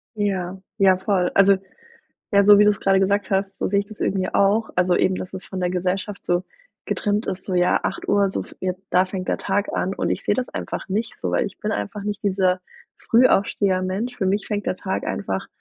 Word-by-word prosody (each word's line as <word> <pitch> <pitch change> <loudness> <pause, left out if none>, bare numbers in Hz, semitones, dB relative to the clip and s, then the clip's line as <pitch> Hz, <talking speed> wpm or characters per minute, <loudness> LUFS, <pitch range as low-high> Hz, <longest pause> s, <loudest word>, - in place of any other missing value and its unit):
Ja, 190 -3 -2 0.2
ja 190 -3 +5
voll. 185 -2 0
Also, 195 0 +6 0.8
ja, 200 0 +6
so 205 0 +8
wie 210 - +7
du's 210 -1 +3
gerade 195 0 +3
gesagt 200 +2 +1
hast 195 0 0
so - - -1
sehe 200 +1 +2
ich 200 - -7
das 215 -1 -13
irgendwie 190 -1 0
auch. 205 +3 +3
Also 180 0 +2
eben, 190 - +2
dass 185 0 -6
es 190 - -8
von 190 -1 -5
der 180 0 0
Gesellschaft 185 +3 -2
so 175 +1 +1 0.4
getrimmt 205 +1 -1
ist, 185 0 -4
so: 190 - -3
„Ja, 180 0 +3
8:00, 200 -1 +1
so - - -3
f - - -14
jetzt 185 0 -3
da 185 - +4
fängt 185 -1 -5
der - - 0
Tag 200 +1 -1
an“ 190 +1 -1
und - - -2
ich - - -2
sehe 205 - +2
das 255 0 -2
einfach - - -5
nicht 215 +4 -2
so, 90 - -1
weil 90 - +1
ich - - -9
bin - - -2
einfach 105 - -4
nicht 205 +1 -4
dieser 185 -2 +1 0.4
Frühaufsteher-Mensch. 200 -2 +2
Für 190 - -1
mich 200 +2 0
fängt 205 -2 -3
der - - -1
Tag 190 0 -3
einfach 95 0 -3
195 Hz, 225 wpm, -22 LUFS, 185-205 Hz, 0.8 s, so